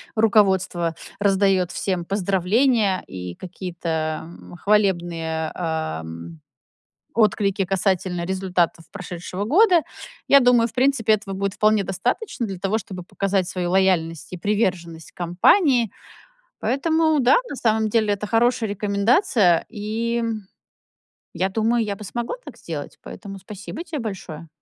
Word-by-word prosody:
руководство 190 -6 +2 0.2
раздаёт 195 -2 +2
всем 185 -3 -2
поздравления 200 +3 +1
и 90 -1 -7
какие-то, 165 -4 -4
м, 170 +1 -12
хвалебные, 175 -5 0
эм, 85 - -4 0.7
отклики 205 -3 +2
касательно 185 -2 -1
результатов 180 -3 -1
прошедшего 185 0 -6
года. 350 - +5 0.4
Я 280 0 +7
думаю, 245 -2 +4
в 225 - -14
принципе, 255 -4 +3
этого 205 -2 -2
будет 195 0 -2
вполне 215 -2 +2
достаточно 240 - -2
для 190 -3 -6
того, 200 +3 0
чтобы 185 -3 -7
показать 195 0 -1
свою 180 -1 -3
лояльность 180 -4 +1
и - - -4
приверженность 175 -5 -2
компании. 230 - +3 0.7
Поэтому, 315 +1 +1
да, 255 +2 +5
на - - -5
самом 220 -4 +1
деле 215 -1 +2
это 205 +1 -5
хорошая 230 0 +2
рекомендация, 200 - +2
и, 225 +2 -3
м, 220 -4 -3 0.8
я 185 +3 0
думаю, 225 +3 +1
я 205 -1 -2
бы 205 - -11
смогла 235 - -4
так - - -10
сделать. - - -7
Поэтому 195 -2 -9
спасибо 200 - -8
те 305 -5 -5
большое. 175 -7 -7
195 Hz, 125 wpm, -22 LUFS, 175-225 Hz, 0.8 s, Я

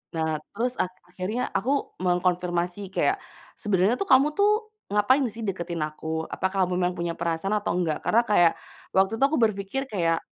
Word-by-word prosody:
Nah, 160 -1 0
terus 245 +4 -1
ak 185 - 0 0.2
akhirnya 190 +7 -3 0.2
aku 240 +7 -2 0.3
mengkonfirmasi 180 0 0 0.2
kayak, 395 - +2 0.4
"Sebenernya 205 +3 +2
tuh 395 - -2
kamu 265 +3 +7 0.6
ngapain 230 +7 +3
sih 225 0 -7
deketin 170 -5 -3
aku? 155 +1 -7 0.3
Apakah 190 0 0
kamu 180 0 -1
memang 180 0 +1
punya 170 -1 -2
perasaan 170 +5 -1
atau 205 - -2
enggak?" 165 -4 0
Karena 235 - +4
kayak, 175 -5 +5 0.4
waktu 190 +1 +4
itu - - +2
aku 310 - 0
berpikir 200 +5 -2
kayak 165 -4 +1
185 Hz, 165 wpm, -26 LUFS, 175-215 Hz, 0.6 s, kamu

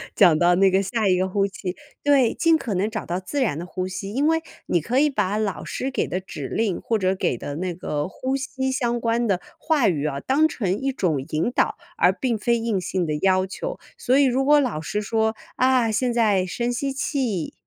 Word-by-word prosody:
讲 175 -7 +6
到 175 0 +4
那 190 +1 +4
个 190 +1 +3
下 210 +2 -1
一 185 - +4
个 185 +1 0
呼 195 +1 +1
气， 190 -2 -6 0.3
对， 275 -5 +4
尽 330 -1 +3
可 235 -8 -4
能 195 +3 0
找 220 0 -5
到 175 +2 -2
自 190 +10 -4
然 195 - 0
的 175 - -5
呼 185 0 -3
吸， 195 +1 -5
因 285 +4 +2
为 325 0 +2 0.2
你 175 - +1
可 235 - -1
以 300 - +4
把 205 -6 0
老 215 -3 -2
师 265 - -4
给 - - -1
的 185 - -2
指 150 -7 -7
令 215 - -1
或 225 - 0
者 190 -2 +1
给 155 - -1
的 145 +4 -6
那 180 +1 -2
个 150 -4 -3
呼 260 +8 -3
吸 265 0 -2
相 240 -3 0
关 230 0 0
的 190 -3 +1 0.2
话 305 -6 +2
语 155 -5 0
啊， 140 -2 -3
当 290 - +3
成 200 - -1
一 270 0 -1
种 165 - -1
引 160 +10 0
导， - - +1 0.2
而 180 - +5
并 235 +4 -1
非 235 +3 +1
硬 225 -4 -1
性 180 0 -1
的 155 - -2
要 185 -1 +3
求， - - -6 0.2
所 255 +2 +2
以 285 - +5
如 265 0 +2
果 295 +2 +5
老 245 - -1
师 205 +6 -2
说： 220 +1 0 0.2
“啊， 255 -3 +3
现 245 +3 +1
在 210 -6 +2
深 235 +6 -2
吸 275 +3 -2
气， 255 - -2
215 Hz, 250 characters per minute, -23 LUFS, 185-255 Hz, 0.3 s, 讲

